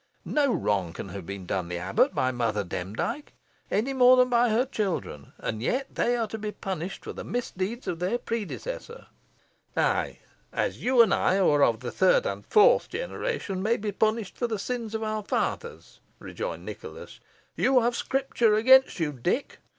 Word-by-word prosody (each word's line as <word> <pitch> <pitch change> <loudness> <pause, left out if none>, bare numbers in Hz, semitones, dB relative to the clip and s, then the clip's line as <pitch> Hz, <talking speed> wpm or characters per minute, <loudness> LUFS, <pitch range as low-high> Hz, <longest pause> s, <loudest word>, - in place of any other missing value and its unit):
No 285 -3 +2
wrong 95 - 0
can 100 - -7
have 95 -2 -8
been 100 -1 -6
done 90 -1 -2
the 90 0 -4
abbot 90 +3 +1
by 130 - +1
Mother 115 -4 -1
Demdike, 100 - -4 0.4
any 255 +6 0
more 255 -1 +6
than 250 0 +4
by 240 0 +3
her 230 +4 +2
children, 190 - -3
and 110 0 -4
yet 260 - -1
they 245 0 +1
are 230 - 0
to 220 - -5
be 210 0 -3
punished 190 -2 -5
for - - -6
the - - -7
misdeeds 235 -1 -4
of 165 - -2
their 185 +7 0
predecessor." 465 - -5 0.7
"Ay, - - +1
just - - -31 0.2
as - - -2
you 250 -1 +6
and 205 -4 +1
I, 190 - +2
who 190 - +3
are 145 -1 +3
of 115 0 +2
the 125 - -4
third - - +3
and - - -3
fourth 465 +4 +5
generation, 465 - -3
may 225 +4 +2
be 205 0 -3
punished 215 0 -1
for 240 - +1
the 220 -2 -2
sins 230 +1 -4
of 220 - -2
our 215 0 -2
fathers," 470 - -3 0.2
rejoined - - -6
Nicholas. - - -9 0.4
"You 260 -1 +3
have 240 +1 +1
Scripture 250 -5 +1
against 260 +1 +5
you, 160 -3 0
Dick. 175 - -2
220 Hz, 185 wpm, -27 LUFS, -, 0.7 s, more